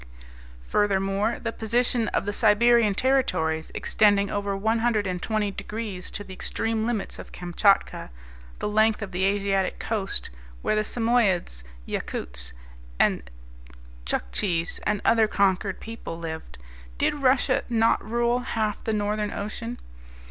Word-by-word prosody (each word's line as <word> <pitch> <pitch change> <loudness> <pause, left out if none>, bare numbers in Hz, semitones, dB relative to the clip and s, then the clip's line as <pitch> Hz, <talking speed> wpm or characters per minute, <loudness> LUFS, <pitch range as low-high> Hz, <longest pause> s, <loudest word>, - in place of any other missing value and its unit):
Furthermore, 200 - +1
the 230 - -3
position 235 +1 +1
of - - -1
the 205 - -2
Siberian 220 0 +4
territories, 160 -12 +1
extending 205 -2 +3
over 200 -1 -1
120 215 -2 0
degrees 210 -3 -5
to 205 - -6
the 190 - -10
extreme 225 +3 -2
limits 225 -5 -3
of - - -9
Kamchatka, 180 - +1 0.5
the - - -2
length 215 +1 +2
of 195 - -6
the 185 +1 -1
Asiatic 195 -1 +1
coast, 200 - -3 0.3
where - - +1
the 215 - +2
Samoyedes, 215 - +1 0.2
Yakoutes, - - -3 1.6
Tchuoktchis, 165 - -1
and 210 -1 +1
other 225 -1 +5
conquered 195 -1 +1
people 225 -7 -7
lived, 160 - -7 0.4
did - - +2
Russia 270 -3 +2
not 225 -1 +3
rule 235 +2 +1
half 220 -4 -2
of - - -19
the 220 - 0
Northern 210 0 0
Ocean? 230 +4 -5
210 Hz, 125 wpm, -26 LUFS, 195-225 Hz, 1.6 s, other